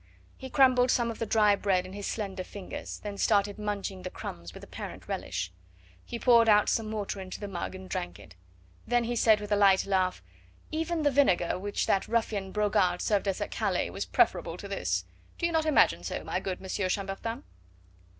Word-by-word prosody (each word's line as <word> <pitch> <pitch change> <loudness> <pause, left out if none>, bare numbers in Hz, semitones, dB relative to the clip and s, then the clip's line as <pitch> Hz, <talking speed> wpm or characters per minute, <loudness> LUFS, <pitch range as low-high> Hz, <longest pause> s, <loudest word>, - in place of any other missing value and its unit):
He 265 - -9
crumbled 255 -2 +5
some 235 -2 +2
of 225 - -9
the 230 - -2
dry 210 -2 +4
bread 190 -3 +1
in 185 - -9
his 205 0 -5
slender 195 -4 -3
fingers, 195 0 -7
then 205 -1 -6
started 205 -1 +2
munching 200 -2 -3
the 185 - -5
crumbs 85 - -7
with - - -12
apparent - - -8
relish. 90 +1 -3 0.5
He 235 - -6
poured 235 -2 +5
out 210 -1 +5
some 220 -1 0
water 205 -2 -3
into 185 -1 -7
the 205 - -5
mug 190 -1 -5
and 185 0 -9
drank 90 - -4
it. 100 -2 -14 0.5
Then 240 0 +2
he 240 +1 -2
said 220 -2 +5
with 210 0 -7
a - - +5
light 195 -2 +5
laugh: 185 - 0 0.5
"Even 325 +1 -1
the 290 - +3
vinegar 190 -11 +2
which 205 +2 -2
that 195 - +1
ruffian 215 -4 -1
Brogard 205 -4 +2
served 205 -1 +1
us 195 - -1
at - - -3
Calais - - -1
was - - -4
preferable - - +1
to - - -8
this, - - -1 0.3
do 335 - -1
you 340 - +1
not 320 -1 +1
imagine 305 - +4
so, - - -4
my - - -2
good 185 -2 -4
Monsieur 190 0 -2
Chambertin?" 200 +7 -3
205 Hz, 200 wpm, -29 LUFS, 190-230 Hz, 0.5 s, crumbled